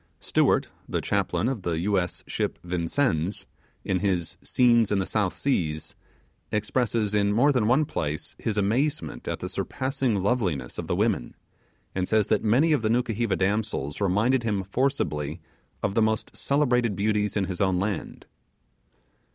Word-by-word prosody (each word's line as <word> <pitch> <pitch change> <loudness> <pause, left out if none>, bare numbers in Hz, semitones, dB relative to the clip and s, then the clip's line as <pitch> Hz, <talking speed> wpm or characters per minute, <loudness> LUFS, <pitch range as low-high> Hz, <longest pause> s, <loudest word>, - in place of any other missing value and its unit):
Stewart, - - +2 0.2
the - - 0
chaplain 110 - 0
of 130 -5 -2
the 85 -3 -1
U.S. 95 -2 0
ship - - -2
Vincennes, 90 - -1 0.4
in 95 -1 +1
his 90 -3 -1
'Scenes 120 -3 +3
in 100 - +3
the 95 - 0
South 100 -3 0
Seas', 80 - -1 0.6
expresses, 110 -1 0
in 100 -1 +2
more 125 +8 +4
than 125 -6 +1
one 135 +6 +4
place, 75 - -3
his 105 -2 -2
amazement 115 - 0
at - - -3
the - - -3
surpassing 130 -3 -1
loveliness 90 - -1
of - - -4
the - - 0
women; - - 0 0.6
and 90 -1 -1
says 110 -2 +3
that 105 - +1
many 130 +9 +4
of 145 - +2
the 110 - 0
Nukuheva 115 -3 +1
damsels 95 -6 -1
reminded 110 +7 +2
him 105 -4 -1
forcibly 90 - -1 0.4
of - - 0
the 115 - +2
most 110 0 0
celebrated 125 -6 +1
beauties 105 +1 0
in 100 - +1
his 95 0 -4
own 95 -2 +2
land. 100 -2 -3
105 Hz, 155 wpm, -26 LUFS, 95-120 Hz, 0.6 s, more